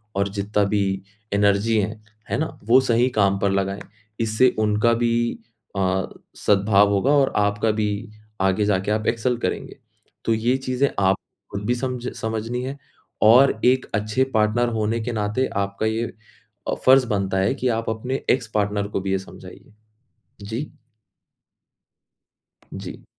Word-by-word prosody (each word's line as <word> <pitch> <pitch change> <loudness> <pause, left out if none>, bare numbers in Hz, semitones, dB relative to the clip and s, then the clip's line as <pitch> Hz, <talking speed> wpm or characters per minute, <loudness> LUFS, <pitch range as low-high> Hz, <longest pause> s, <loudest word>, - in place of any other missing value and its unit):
और 100 0 +1
जितना 100 +1 0
भी 100 -1 0 0.3
एनर्जी 100 +2 +2
है, 105 +2 -4 0.3
है - - 0
ना? 150 -3 -3
वो 115 +5 +6
सही 125 0 +2
काम 100 -1 +3
पर 100 0 +1
लगाएँ। 100 0 -1 0.4
इससे 115 +3 +3
उनका 105 +2 +2
भी 120 0 0 0.4
अ, 95 0 +1 0.3
सद्भाव 100 0 +3
होगा 100 +8 +2
और 140 -2 +4
आपका 105 +1 +1
भी, 105 0 -2 0.3
आगे 95 +2 +2
जाके 100 0 0
आप 110 0 -1
एक्सेल 120 +2 +1
करेंगे। - - -3 0.5
तो 115 - +2
ये 120 +3 +1
चीज़ें 130 +1 0
आप 95 0 +3 0.4
खुद 100 0 -5
भी 120 - +2
सम्झ 125 0 -3
समझनी 115 +2 -3
है 135 +2 -5 0.5
और 120 +1 +6
एक 130 +1 +3
अच्छे 105 +5 +1
पार्टनर 110 +3 +2
होने 110 +2 0
के 120 - -3
नाते 105 +4 0 0.2
आपका 100 +2 -3
ये 110 +2 -1 0.6
अ, - - +1
फर्ज़ 130 -1 +6
बनता 100 -2 -1
है 95 +6 +2
कि 130 -1 -2
आप 115 - -4
अपने 125 +5 -3
एक्स 125 -2 0
पार्टनर 100 -1 0
को - - 0
भी 95 0 -3
ये 95 - +1
समझाइए। 95 - -13 0.7
जी। 115 +8 -5 2.0
जी। - - -8
110 Hz, 155 wpm, -23 LUFS, 100-120 Hz, 2.0 s, वो